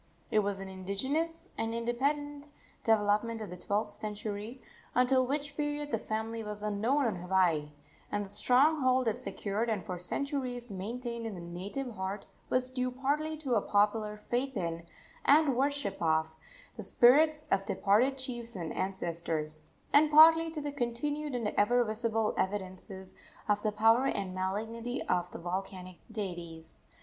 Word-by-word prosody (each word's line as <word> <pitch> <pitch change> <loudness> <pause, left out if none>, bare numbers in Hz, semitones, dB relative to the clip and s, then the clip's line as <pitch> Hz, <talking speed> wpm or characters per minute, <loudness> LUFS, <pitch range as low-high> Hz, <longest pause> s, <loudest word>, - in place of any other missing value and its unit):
It 215 - +4
was 200 -1 -1
an 195 - -6
indigenous 265 - -2
and 225 0 -1
independent 285 +5 -1 0.4
development 220 +1 +2
of 215 -3 -6
the - - -5
twelfth 205 +4 +3
century, 210 +3 -2 0.4
until 255 +1 +4
which 285 +1 -3
period 295 -1 -2
the 225 - 0
family 220 +1 -3
was 210 -1 -5
unknown 225 +7 +1
on 220 -5 0
Hawaii; 175 -4 +1 0.4
and 205 0 -1
the - - -9
strong 265 +9 +3
hold 255 -1 +3
it 220 - 0
secured 210 +3 -2
and 205 -6 -2
for 180 -1 -5
centuries 250 +3 -2
maintained 230 +4 -4
in 215 - -5
the - - -7
native 190 +10 -5
heart 195 0 -4 0.2
was 255 0 +1
due 255 -1 -1
partly 290 +5 -1
to 280 -5 -2
a 215 - +3
popular 210 +1 +1
faith 245 +4 -2
in, 170 -1 -3 0.4
and 290 -2 +5
worship 275 -4 0
of, 160 -1 +2 0.5
the - - -5
spirits 300 +5 +5
of 195 0 +2
departed 240 +7 +2
chiefs 240 -3 -5
and 165 -4 -4
ancestors, 165 -4 -2 0.3
and 295 +1 +6
partly 325 +2 +8
to 315 -2 -5
the 290 0 -3
continued 285 +3 -2
and 230 -4 -1
ever 245 +5 +3
visible 220 0 0
evidences 190 0 -3 0.3
of 205 0 +2
the 215 - 0
power 225 +5 +4
and 195 -7 -2
malignity 225 +6 -3
of 180 -1 0
the - - -8
volcanic 185 +1 -5
deities. 175 -6 -6
225 Hz, 155 wpm, -31 LUFS, 195-260 Hz, 0.5 s, partly